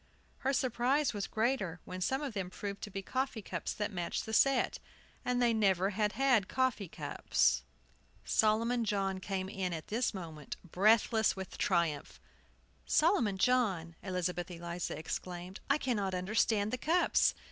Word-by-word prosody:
Her 270 - +1
surprise 260 +2 +1
was 205 -2 -3
greater 215 -7 0
when 185 0 -6
some 265 +9 0
of 275 -5 -4
them 190 -3 -3
proved 200 +1 -6
to - - -5
be 195 0 -5
coffee 260 -1 -2
cups 170 -3 -4
that 210 0 -2
matched 175 -3 -3
the 220 - -6
set! 270 +3 +3 0.4
And 250 0 0
they 240 -1 +3
never 195 -3 +2
had 210 +1 0
had 260 -8 +3
coffee 260 -7 0
cups. - - +1 0.6
Solomon 230 +3 +2
John 195 -3 0
came 190 0 -3
in 190 -2 -3
at 160 -1 -6
this 230 +4 +1
moment, 160 -6 -7
breathless 215 +5 +3
with 190 -1 -7
triumph. 170 -6 0 0.7
"Solomon 255 - +3
John!" 190 -8 +1
Elizabeth 180 -2 -2
Eliza 170 0 -4
exclaimed; 180 +3 -5
"I 275 - +4
cannot 205 -9 -1
understand 205 +2 +1
the 255 - -1
cups!" 340 +6 +3
205 Hz, 150 wpm, -33 LUFS, 185-240 Hz, 0.7 s, I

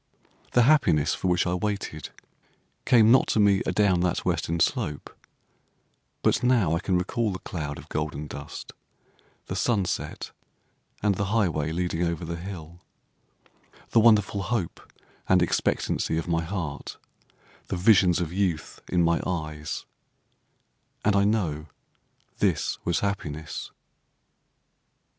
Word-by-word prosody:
The 120 - +5
happiness 95 - +4
for - - -2
which 90 -1 +2
I 90 - 0
waited 95 -5 -3 0.8
came 115 -3 +6
not 130 - +5
to - - +1
me 100 -2 +4
adown 95 -1 +3
that 90 0 0
western 85 +1 -1
slope, 85 - -1 1.1
But - - +3
now 120 -10 +3
I - - 0
can 90 0 0
recall 110 +4 -1
the 95 - -4
cloud 75 -6 -5
of - - -11
golden 75 -1 -3
dust, 70 -1 -8 0.7
the 95 - -5
sunset, 100 0 -1 0.7
and 105 -1 +3
the 100 +1 -2
highway 90 -8 0
leading 85 0 -2
over 85 -1 -1
the 85 +1 -4
hill, 85 -2 -8 1.1
The - - +5
wonderful 105 -3 +4
hope 110 -4 -2 0.5
and 95 - +6
expectancy 80 -1 0
of 80 - -3
my 85 -1 +1
heart, 85 -5 -5 0.7
the 95 - -3
visions 90 -2 +5
of 85 -1 -3
youth 90 -5 -2
in 90 -1 +2
my 85 0 +2
eyes; 75 -4 -4 1.2
and 105 -1 +3
I 100 0 +4
know 85 -8 0 0.7
this - - 0
was 85 -1 0
happiness. 80 -6 -4
90 Hz, 130 wpm, -26 LUFS, 80-100 Hz, 1.2 s, came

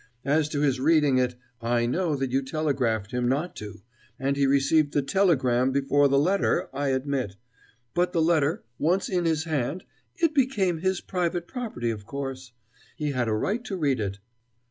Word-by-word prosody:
As 150 +1 +2
to 145 -2 -2
his 135 -3 +2
reading 145 -2 +4
it, 125 -1 0 0.3
I 120 0 +1
know 160 +5 0
that 135 -2 -2
you 135 +1 +2
telegraphed 135 -7 -1
him 125 0 0
not 150 +7 -1
to, 105 -2 -9 0.3
and 135 +2 0
he 140 -1 +2
received 140 +2 +3
the 145 - +2
telegram 135 -7 +2
before 140 +1 +3
the 140 0 +2
letter, 185 +8 +1
I 145 0 -1
admit; 130 -6 -1 0.6
but, 180 +1 +1
the 175 - 0
letter 160 +4 +2 0.2
once 180 +5 +1
in 180 -2 0
his 160 -1 +1
hand, 155 +1 -2 0.3
it 330 -2 +1
became 210 - +1
his 190 +1 0
private 175 -1 -2
property, 215 - -3
of 105 -2 -7
course. 135 -1 -5 0.4
He 150 -1 -2
had 125 -3 -1
a 110 - +1
right 205 - -1
to 195 - -4
read 140 -7 +1
it." 100 -2 -3
140 Hz, 180 wpm, -26 LUFS, 130-170 Hz, 0.6 s, reading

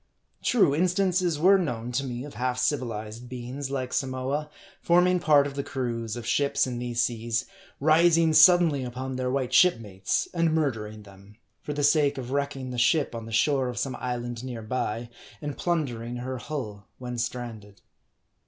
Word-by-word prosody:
True, 205 - +3
instances 180 0 +1
were 190 +5 +5
known 125 -8 -3
to 130 +3 -1
me 125 -2 -5
of 145 - -9
half 125 0 -2
civilized 120 -3 -2
beings, 130 +2 -6
like 130 -2 -3
Samoa, 135 +3 -2 0.3
forming 180 +1 +4
part 145 -4 +4
of 140 - -4
the 140 - -2
crews 115 -5 -3
of 120 -1 -7
ships 140 +4 +1
in 125 -2 -4
these 120 -1 -3
seas, 115 +1 -1 0.3
rising 160 +2 +4
suddenly 155 -3 +6
upon 130 +1 -5
their 125 0 -1
white 130 -1 -1
ship 180 0 +6
mates, 100 -4 -2
and 165 -2 +1
murdering 110 -8 -2
them, 100 +1 -16 0.3
for 150 - -5
the 145 0 -2
sake 145 -1 +3
of 130 -1 -6
wrecking 140 -2 -2
the 125 - -3
ship 140 +5 +2
on 115 -1 -6
the - - -8
shore 130 +3 +2
of 125 - -6
some 135 - -2
island 120 -1 -4
near 120 -3 -6
by, 115 0 -3 0.3
and 145 -2 -5
plundering 125 -9 -2
her 125 +1 -4
hull, 110 -9 -6
when 125 -1 -5
stranded. 115 -4 -5
130 Hz, 170 wpm, -26 LUFS, 120-150 Hz, 0.3 s, suddenly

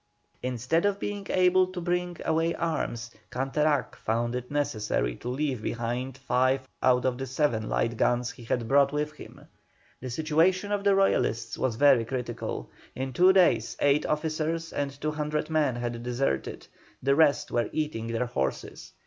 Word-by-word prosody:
Instead 125 +6 0
of 200 -1 +1
being 205 -1 -4
able 185 0 +4
to 185 -1 -6
bring 175 0 -1
away 165 +1 +1
arms, 120 -8 -2 0.2
Canterac 140 +4 0
found 120 +2 -1
it 125 0 -4
necessary 110 - -1
to 125 - -6
leave 130 -2 -1
behind 120 +4 -3
five 130 0 +1
out 125 0 +3
of 130 -1 0
the 135 - -3
seven 125 -5 0
light 115 0 0
guns 125 +1 +1
he 120 - -13
had 115 0 -1
brought 140 +2 +4
with 150 +1 -1
him. 155 - -13 0.6
The 130 - -6
situation 165 - +1
of 205 -1 0
the 200 -1 +4
Royalists 120 -11 +1
was 130 -4 -1
very 135 -2 +5
critical; 120 - -4 0.2
in 130 0 -4
two 180 +7 +6
days 175 - +3
eight 145 +1 +3
officers 160 +1 -2
and 140 -1 -1
200 150 0 -2
men 150 -5 +2
had 120 -1 -4
deserted, 120 - -2 0.4
the 140 +1 +3
rest 145 -1 +3
were 120 - 0
eating 150 -8 -2
their 115 +2 -1
horses. 70 - -4
135 Hz, 160 wpm, -27 LUFS, 120-160 Hz, 0.6 s, two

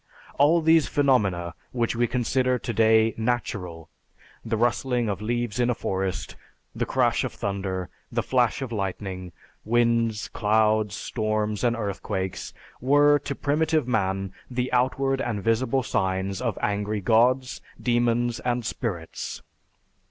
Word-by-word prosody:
All 155 +4 +5
these 160 -1 +4
phenomena 100 - +1 0.2
which 120 -1 0
we 120 +1 +2
consider 125 +1 +1
today 110 -1 +3
natural 100 -8 -2 0.6
the 110 -1 -1
rustling 120 +1 +1
of 100 -1 -2
leaves 120 0 -2
in 120 0 +2
a 125 - +1
forest, 95 -3 -3 0.4
the - - -2
crash - - +2
of - - -3
thunder, 95 -2 -3 0.2
the - - 0
flash 125 +1 +1
of 125 - -6
lightning, 95 -3 -4 0.3
winds, 115 -1 +1
clouds, 110 -1 +2
storms, 110 -1 -2
and 120 -1 +2
earthquakes 95 -3 -3 0.3
were 145 +3 +5
to 140 0 -5
primitive 155 0 +1
man 95 -4 -1 0.2
the 125 0 -2
outward 135 +2 +1
and 105 -7 -2
visible 125 +3 +1
signs 95 0 -1
of 115 -5 -1
angry 105 +1 0
gods, 125 +5 +2 0.2
demons, 120 -1 +1
and 120 -1 -1
spirits. 95 -8 -4
115 Hz, 130 wpm, -25 LUFS, 100-125 Hz, 0.6 s, All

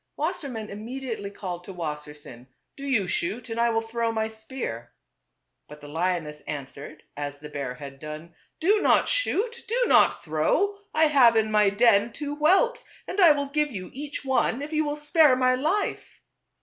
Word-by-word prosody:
Wassermann 280 - -3
immediately 225 0 -5
called 180 -3 -6
to 195 - -8
Wassersein, 150 -6 -7
" - - -53
Do 280 0 -7
you 225 -9 +1
shoot, 220 +8 -2
and 225 - -3
I 235 0 +3
will 225 0 0
throw 230 0 -1
my 220 -1 -1
spear." 220 - -7 0.7
But 150 0 -12
the 145 - -11
lioness 160 -2 -2
answered 145 +1 -7
as 145 0 -5
the 150 +1 -10
bear 140 -4 -4
had 140 +1 -10
done, 155 +3 -8
" - - -48
Do 410 +6 +3
not - - +4
shoot, 475 -2 0
do - - +1
not - - +4
throw; 175 - 0
I 315 - +2
have 265 -6 +5
in 220 -1 +2
my 210 -1 +4
den 215 +1 +3
two 290 -1 -4
whelps, 385 +12 +2 0.2
and 380 - -4
I 340 -4 +9
will 285 -1 -3
give 300 +1 +1
you 185 -5 -7
each 285 +1 -6
one, 265 0 +1
if 305 +2 -7
you 310 0 +1
will 295 0 -2
spare 295 -2 +4
my 255 0 +3
life." 315 +11 -2
225 Hz, 185 wpm, -26 LUFS, -, 0.7 s, I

